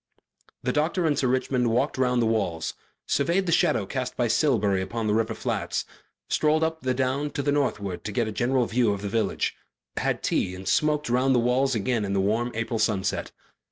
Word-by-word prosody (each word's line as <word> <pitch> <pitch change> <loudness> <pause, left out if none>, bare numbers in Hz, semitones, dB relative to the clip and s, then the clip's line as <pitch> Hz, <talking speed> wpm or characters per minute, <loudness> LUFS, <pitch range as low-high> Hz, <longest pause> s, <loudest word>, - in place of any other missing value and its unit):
The 125 0 0
doctor 165 +4 +1
and 150 -2 +2
Sir 130 - +1
Richmond 125 -1 +1
walked 115 +2 +1
round 125 -2 +2
the - - +2
walls, 100 -8 -1 0.3
surveyed 170 +7 +1
the 170 - 0
shadow 155 - +2
cast 125 +4 -4
by 120 - +2
Silbury 110 -7 +2
upon 115 +4 -3
the 105 - +1
river 110 0 0
flats, - - -2 0.4
strolled 155 +1 +2
up 160 0 -1
the 130 -1 0
down 135 +3 0
to 140 - -3
the 145 - +1
northward 105 -10 -1
to 105 - -3
get 115 +2 0
a - - -3
general 125 +3 +1
view 115 -2 +2
of 100 0 -6
the 100 - -2
village, 110 +2 0 0.4
had - - -1
tea 90 - 0
and 95 +1 -9
smoked 150 -1 +2
round 130 +2 +2
the - - +4
walls 125 +2 +2
again 115 +1 0
in 100 -1 -2
the 100 - +1
warm 110 +5 +1
April 115 0 -2
sunset. 100 -3 0
125 Hz, 205 wpm, -26 LUFS, 110-135 Hz, 0.4 s, the